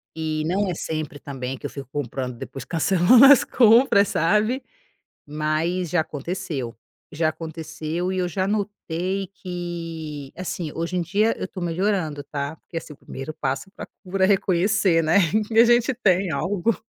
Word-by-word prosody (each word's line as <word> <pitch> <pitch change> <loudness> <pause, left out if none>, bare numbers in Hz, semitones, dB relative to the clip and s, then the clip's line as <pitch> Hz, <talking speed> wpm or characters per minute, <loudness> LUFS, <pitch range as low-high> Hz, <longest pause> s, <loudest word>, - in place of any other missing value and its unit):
e 155 -1 -2
não 190 +4 0
é - - -1
sempre 155 -3 -4
também 135 -2 -5
que 145 - -11
eu - - -2
fico 135 -3 -8
comprando 125 -3 -4
depois 135 - -7
cancelando 185 - +5
as 275 -1 +8
compras, 225 -3 +5
sabe, 215 - +1 0.6
mas 155 +4 -1
já 175 0 +2
aconteceu, 145 -5 -5 0.4
já 155 +1 +1
aconteceu 160 +2 -4
e 185 - -1
eu 180 - 0
já 185 +2 -1
notei 195 -2 -2
que, 165 -6 -6
assim, 175 -3 -4
hoje 170 +2 -3
em 180 - +1
dia 205 +7 +1
eu - - -4
tô 185 - -8
melhorando, 175 -4 -1
tá, 140 +1 -4
porque 165 - -9
assim 165 -2 -6
o - - -20
primeiro 135 +4 -7
passo 140 +7 -3
pra - - -8 0.2
cura 190 0 -1
é - - +2
reconhecer, 190 -2 +2
né, 160 +4 +3 0.3
que 225 - -3
a 230 - +8
gente 240 +2 +3
tem 190 -6 +2
algo. 185 +8 0
170 Hz, 165 wpm, -23 LUFS, 155-195 Hz, 0.6 s, as